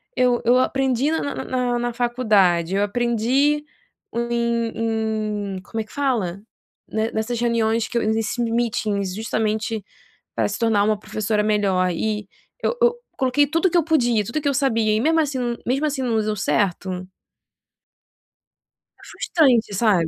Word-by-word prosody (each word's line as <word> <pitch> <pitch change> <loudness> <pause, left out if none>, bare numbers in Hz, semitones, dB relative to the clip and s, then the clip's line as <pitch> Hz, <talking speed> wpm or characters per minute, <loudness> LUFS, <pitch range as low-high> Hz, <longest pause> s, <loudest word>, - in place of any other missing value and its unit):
eu 250 -1 +2
eu 245 +2 +5
aprendi 265 +1 +1
na 320 - 0
na 285 - -3
na - - -4
na 250 -1 0
na 240 0 -2
faculdade, 210 -8 +2
eu 200 - +2
aprendi 240 +7 +1 0.5
em 235 -1 0 0.8
em 185 - -6
como 225 +3 -6
é - - -3
que 215 - -18
fala? 225 -10 -1 0.5
Ne 220 +1 -1
nessas 225 +2 -2
reuniões 230 -1 +1
que 240 - -3
eu - - +2
nesse, 220 +2 0
meetings 220 -4 -1
justamente 220 0 -2 0.5
para - - +1
se 200 - -4
tornar 225 -3 +3
uma 215 0 +2
professora 215 0 -1
melhor 195 -4 +2
e 210 +4 -2 0.4
eu - - +1
eu 480 0 +4 0.2
coloquei 265 +2 +3
tudo 330 +5 +2
que 350 - +2
eu 340 - +4
podia, 240 -9 +2
tudo 235 - -4
o - - 0
que 285 - +1
eu - - 0
sabia 230 -5 +2
e - - +1
mesmo 320 +5 +3
assim 260 -6 -1
mesmo 270 +5 +1
assim 290 -3 -1
não 235 -3 +1
deu 215 0 -1
certo. 185 -2 -1 1.9
É - - -18
frustrante, 260 -9 +2
sabe? 195 -8 +3
230 Hz, 165 wpm, -22 LUFS, 215-255 Hz, 1.9 s, eu